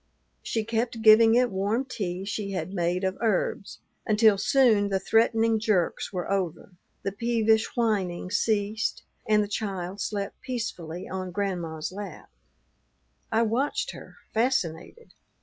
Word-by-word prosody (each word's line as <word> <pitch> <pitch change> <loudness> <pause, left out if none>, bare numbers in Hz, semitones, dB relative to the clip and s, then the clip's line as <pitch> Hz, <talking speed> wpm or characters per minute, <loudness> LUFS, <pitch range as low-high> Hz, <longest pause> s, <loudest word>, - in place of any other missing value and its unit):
She 225 - -2
kept 230 +1 -2
giving 225 +1 +7
it 245 0 +3
warm 205 +7 0
tea 190 -7 -4
she 200 -1 -3
had 185 0 -4
made 175 0 0
of 190 0 -1
herbs, 455 - -1 0.3
until 215 -1 +4
soon 210 -1 +3
the 195 -1 +1
threatening 225 +1 +2
jerks 210 -6 0
were 180 -1 -4
over, 185 -2 -2 0.3
the 195 - -1
peevish 225 +1 +1
whining 190 -6 0
ceased, 215 0 0 0.3
and 210 -1 +4
the - - -4
child 195 -2 -4
slept 200 -2 -4
peacefully 185 -9 -5
on 185 -1 -4
Grandma's 175 -5 -3
lap. 195 - -8 1.0
I 225 +1 +3
watched 240 +6 0
her, - - -12 0.2
fascinated. 230 - -1
205 Hz, 130 wpm, -26 LUFS, 185-225 Hz, 1.0 s, giving